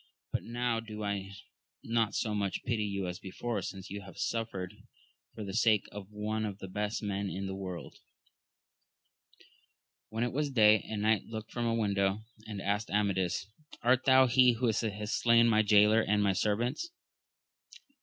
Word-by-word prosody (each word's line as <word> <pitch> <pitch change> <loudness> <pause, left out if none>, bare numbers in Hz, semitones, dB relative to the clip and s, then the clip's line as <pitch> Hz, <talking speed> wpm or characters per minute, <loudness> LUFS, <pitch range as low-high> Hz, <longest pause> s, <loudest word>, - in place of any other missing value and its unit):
but - - -1
now 120 0 -1
do 110 -2 -7
I 100 -1 -2 0.5
not 115 -2 0
so 110 - 0
much 100 -3 -2
pity 115 -3 0
you 100 -2 -2
as 90 0 -5
before, 115 +5 -4
since 95 0 -7
you 100 0 -5
have 95 0 -12
suffered 110 -6 -3 0.6
for 110 - -5
the 95 -1 -6
sake 110 -1 +3
of 100 -1 -8
one 105 +1 -3
of 100 -3 -3
the 95 - -8
best 105 +3 -3
men 100 -1 -2
in 95 +1 -4
the 95 - -4
world. 95 -3 -7 2.1
When 110 +2 -2
it 120 - -1
was 145 +1 0
day, 110 -4 +5
a 110 - -3
knight 105 -1 +2
looked 110 -1 -7
from 120 -1 -1
a 115 - +1
window 100 -2 +1 0.3
and 105 -3 -5
asked 105 +2 -1
Amadis, 95 -3 0 0.4
Art 130 +2 +3
thou 130 -1 +7
he 125 0 +5
who 120 +2 -1
hast 105 -1 -2
slain 115 0 +5
my 110 -1 +4
jaylor 105 +1 +5
and 105 -1 +2
my 100 -1 +3
servants? 120 - 0
105 Hz, 170 wpm, -31 LUFS, 100-115 Hz, 2.1 s, thou